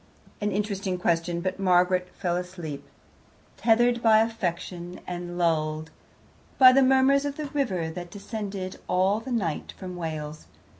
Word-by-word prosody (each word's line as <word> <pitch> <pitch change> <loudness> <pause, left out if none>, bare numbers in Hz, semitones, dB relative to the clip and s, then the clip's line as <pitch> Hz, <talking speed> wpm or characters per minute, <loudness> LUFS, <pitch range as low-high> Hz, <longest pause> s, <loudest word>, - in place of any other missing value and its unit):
An 205 0 0
interesting 195 -2 -2
question, 170 -1 0
but 185 +1 -3
Margaret 180 -1 +3
fell 175 -3 -1
asleep, 175 -5 -5 0.7
tethered 240 +1 +3
by 220 -2 +6
affection, 180 -5 -3
and 175 -1 -5
lulled 155 -2 0 0.7
by 255 -1 +9
the 275 - +5
murmurs 265 +1 +4
of 285 -1 -3
the 305 - -3
river 245 - -1
that 175 +1 -7
descended 200 -1 -6
all 190 +3 +2
the 250 +3 -8
night 185 -10 -2
from 185 -2 -7
Wales. 155 -3 -5
185 Hz, 140 wpm, -26 LUFS, 175-225 Hz, 0.7 s, by